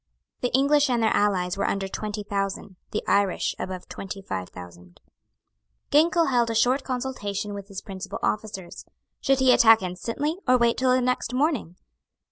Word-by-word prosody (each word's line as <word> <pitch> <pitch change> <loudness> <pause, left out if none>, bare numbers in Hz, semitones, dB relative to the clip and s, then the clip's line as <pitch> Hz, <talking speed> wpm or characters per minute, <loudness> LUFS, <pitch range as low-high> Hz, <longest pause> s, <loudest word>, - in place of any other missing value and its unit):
The 245 - +1
English 285 +1 +3
and 240 -2 +1
their 220 - +2
allies 185 -2 +1
were - - 0
under 195 -1 -1
twenty 210 +1 -5
thousand; 195 -1 -3
the 215 - -3
Irish 200 -2 +1
above 185 -1 -5
twenty 195 0 -7
five 95 - -5
thousand. 90 0 -13 0.9
Ginkell 330 +1 +4
held 240 -2 +2
a 225 - -2
short 250 +5 +2
consultation 240 -6 -3
with 200 -1 -7
his 195 -2 -7
principal 195 0 -7
officers. 200 -4 -3 0.4
Should 270 0 +2
he 260 -1 +5
attack 225 -4 +6
instantly, 230 - -3
or 255 0 +5
wait 235 -1 +2
till 255 0 +3
the 255 0 +3
next 250 -1 -1
morning? 265 - 0
215 Hz, 165 wpm, -25 LUFS, 195-255 Hz, 0.9 s, attack